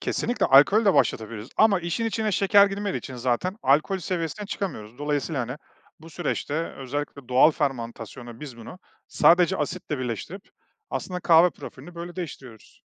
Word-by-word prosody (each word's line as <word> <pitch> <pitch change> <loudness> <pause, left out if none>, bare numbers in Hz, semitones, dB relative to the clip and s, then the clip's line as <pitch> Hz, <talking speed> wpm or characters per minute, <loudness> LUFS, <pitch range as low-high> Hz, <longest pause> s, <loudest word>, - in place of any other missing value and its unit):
Kesinlikle, 245 - -1
alkolü 170 +12 +6
de 195 - +4
başlatabiliriz 110 +1 0
ama 205 -4 +4
işin 175 +7 -2
içine 220 -2 -1
şeker 200 +2 +5
girmediği 200 0 -3
için 130 - -9
zaten 130 - -1
alkol 155 +8 +2
seviyesine 180 +3 -4
çıkamıyoruz. 125 - -5
Dolayısıyla, 145 0 -1
hani, 125 +4 -5 0.4
bu 165 +1 -13
süreçte 155 -3 -3 0.2
özellikle 140 0 -5
doğal 130 +5 +6
fermantasyonla 120 -4 -5
biz 135 -6 -8
bunu 115 +10 -11 0.3
sadece 180 +2 +4
asitle 150 -1 -3
birleştirip 130 - -5 0.5
aslında 180 -1 -4
kahve 170 +1 +5
profilini 150 +3 -11
böyle 170 +1 -8
değiştiriyoruz. 135 - -9
155 Hz, 145 wpm, -25 LUFS, 130-185 Hz, 0.5 s, alkolü